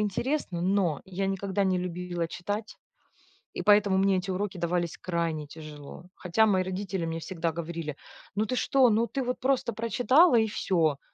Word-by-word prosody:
интересно, 210 - -1
но 185 -5 +1
я 195 +1 -3
никогда 195 0 -1
не 185 -1 +2
любила 180 -1 -3
читать, 205 +6 -5 0.8
и - - -3
поэтому 205 -2 +4
мне 195 0 +3
эти 190 +1 -4
уроки 185 0 -3
давались 170 -1 -1
крайне 165 -4 -2
тяжело. 150 +1 -10
Хотя 205 +5 +2
мои 190 -3 +3
родители 185 -2 -3
мне 165 0 -3
всегда 165 -2 -3
говорили: 165 -3 -5 0.4
"Ну, 215 +1 0
ты 255 - -2
что? 260 -2 +4
Ну, 225 +2 +2
ты 270 - -3
вот 250 0 -2
просто 260 -2 +1
прочитала 245 +8 +4
и 220 - +3
всё!" 165 -8 +1
190 Hz, 165 wpm, -28 LUFS, 170-210 Hz, 0.8 s, поэтому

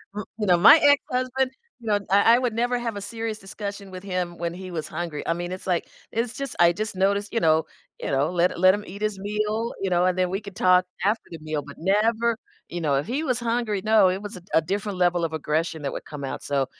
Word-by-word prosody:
Mm 210 -1 -4
you 210 - -1
know, 175 -2 +5
my 215 - +9
ex-husband 260 -2 +2 0.3
you 235 - -15
know, 205 -1 +3
I 200 +4 +6
I - - +2
would 245 -3 -1
never 245 +2 0
have 230 -3 -3
a - - -5
serious 225 +1 -4
discussion 200 0 -7
with 185 0 -8
him 180 -3 -3
when 170 0 -2
he 185 0 -8
was 160 -3 -4
hungry, 160 -2 -5
I 165 - +2
mean, 175 +1 -5
it's 185 +1 -7
like 175 -2 0 0.2
it's 230 +1 -1
just 275 0 -5
I 170 0 +6
just 215 +2 -4
noticed 200 +2 +1
you 230 - +2
know 160 0 +3 0.3
you - - -4
know, 140 +5 +1
let 180 0 +2
hi - - -8
let 185 +2 +6
him 205 +1 -3
eat 200 +3 -9
his 210 -2 -1
meal, 215 +3 -2
you 195 - 0
know, 175 0 +3
and 185 0 +1
then 185 -1 +1
we 195 - -1
could 200 -3 -10
talk 185 0 +4 0.2
after 215 +3 +1
the 165 - -6
meal, 155 -2 -3
but 145 - -11
never 220 +5 +2 0.3
You 175 - -4
know, 145 -3 +1
if 140 - 0
he 270 +7 -1
was 255 -5 0
hungry, 230 -4 -1
no, 215 -3 +5
it 190 +2 -2
was 205 +2 -6
a - - -11
d 175 - -27
a 160 - +6
different 205 -1 -2
level 175 -1 +2
of 160 - -4
aggression 160 +1 -2
that 140 - -2
would - - -6
come 145 -2 -6
out, 135 - -5
so, 140 -1 0
195 Hz, 265 wpm, -24 LUFS, 175-220 Hz, 0.3 s, my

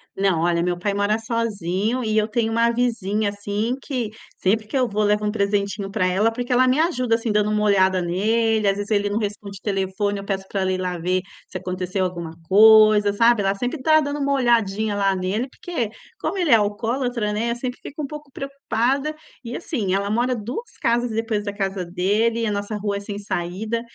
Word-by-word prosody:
Não. 190 -4 +1
Olha, 170 0 +2
meu 175 0 0
pai 200 +3 -1
mora 205 +1 +1
sozinho 225 -1 -1
e 215 -1 -1
eu 215 0 +3
tenho 225 0 0
uma 230 +1 +3
vizinha, 220 -4 0
assim, 205 +4 -2
que 245 -7 -3 0.3
sempre 215 +3 +1
que 270 - -2
eu 255 - +2
vou, 210 -1 0
levo 210 0 +2
um 210 - +1
presentinho 200 -1 -1
pra 195 -2 0
ela, 195 +5 +2
porque 245 +2 -2
ela 255 +1 +4
me 255 +4 +3
ajuda, 255 -9 +2
assim, 225 -1 -2
dando 210 0 +2
uma 210 0 +1
olhada 190 -2 +3
nele. 215 +5 +1
Às 195 - +3
vezes, 205 +1 -5
ele 205 -1 +2
não 205 - -1
responde 205 -2 -4
telefone, 200 0 -1
eu 195 - -8
peço 195 -1 -3
pra 195 -1 -2
ela 190 - +1
ir 185 - -1
lá 180 -1 -2
ver 180 +2 0 0.3
se - - -5
aconteceu 185 +1 -2
alguma 170 -3 -4 0.2
coisa, 215 0 +7
sabe. 230 +1 +4
Ela 195 0 +1
sempre 250 +7 -3
tá 310 +3 +5
dando 290 0 -3
uma 280 0 +1
olhadinha 220 -5 +1
lá, 195 -1 +2
nele, 190 +7 -1
porque, 255 -7 -4 0.3
como - - -2
ele 345 -6 +1
é - - +9
alcoólatra, 225 +1 0
né, 230 +3 -1
eu - - -1
sempre 250 +1 -5
fico 300 +2 -7
um - - -3
pouco 300 -1 -9
preocupada 275 +1 -1 0.3
e 240 0 -6
assim, 230 - -2
ela 200 +1 -1
mora 245 +3 +1
2 245 - -6
casas 240 +1 +1
depois 220 -1 -1
da 205 -1 -4
casa 195 -2 -2
dele 205 +6 +1
e - - 0
a 210 - 0
nossa 205 +1 -3
rua 205 -1 -2
é - - -4
sem 200 0 -6
saída, 205 +4 -3
210 Hz, 215 wpm, -22 LUFS, 200-235 Hz, 0.3 s, é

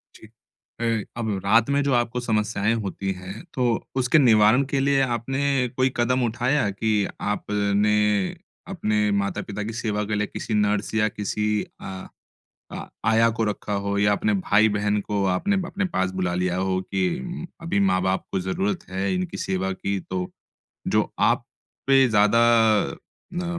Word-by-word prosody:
जी। 110 - -14 0.5
अ, 115 -2 0 0.2
अब 110 -2 -2 0.2
रात 115 +5 +4
में 140 0 +2
जो 140 -2 +1
आपको 120 0 0
समस्याएँ 110 -2 0
होती 95 0 -3
हैं 95 - -9
तो 130 - -1 0.3
उसके 130 +3 +3
निवारण 115 0 +5
के 135 0 -1
लिए 140 0 +2 0.2
आपने 135 +1 0
कोई 130 0 +2
कदम 125 +1 +1
उठाया 120 +1 +1
कि 110 +3 -1 0.3
आपने, 105 0 +1 0.7
अपने 105 0 0
माता-पिता 100 +1 -4
की 110 +2 -5
सेवा 105 -1 -1
के - - +1
लिए 105 0 0
किसी 115 - -5
नर्स 105 +1 -1
या 110 -1 +3
किसी 105 +1 -2 0.3
अ 95 -1 -7 0.6
अ, - - -7 0.2
आया 115 +1 +4
को 115 - +1
रखा 105 0 -3
हो 100 0 -1
या 105 0 +3
अपने 105 +1 +1
भाई-बहन 105 +1 +2
को 100 -2 0
आपने 200 - 0
अपने 200 +3 -2
पास 95 0 +1
बुला 90 -1 0
लिया 90 0 0
हो 95 0 0
कि 175 - -3
अभी 165 -11 -1
माँ-बाप 95 0 +1
को 95 - 0
ज़रूरत 95 +2 -2
है 95 - -1
इनकी 185 -2 -3
सेवा 95 0 -2
की। 100 +1 -3
तो 90 0 -4 0.7
जो - - +2
आप - - +2 0.4
पे 135 -1 +5
ज़्यादा 105 +1 +4 1.0
अ, 175 0 -3
105 Hz, 160 wpm, -24 LUFS, 100-125 Hz, 1.0 s, निवारण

